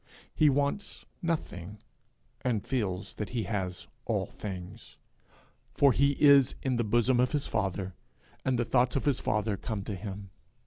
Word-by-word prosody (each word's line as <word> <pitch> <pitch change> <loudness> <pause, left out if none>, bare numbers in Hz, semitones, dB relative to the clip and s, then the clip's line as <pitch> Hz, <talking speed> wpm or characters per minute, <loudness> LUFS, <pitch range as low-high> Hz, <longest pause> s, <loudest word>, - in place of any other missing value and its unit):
He 155 - +5
wants 145 +8 -1 0.2
nothing, 105 - -3 0.7
and 115 -5 0
feels 105 -7 -2
that 105 - -5
he 115 - +1
has 95 -5 -3 0.2
all - - 0
things, 95 +2 -8 0.8
for 140 -1 +6
he 140 +2 +2
is 140 -3 +6
in 130 -2 +1
the 120 - +1
bosom 120 +3 +2
of 125 +3 +2
his 145 -2 +1
father, 95 -2 -2 0.5
and 130 -1 +1
the 120 - +1
thoughts 125 0 +2
of 135 - 0
his 140 -4 +2
father 105 -1 0
come 110 -2 -4
to 105 - -4
him. 100 0 -7
115 Hz, 155 wpm, -30 LUFS, 100-135 Hz, 0.8 s, for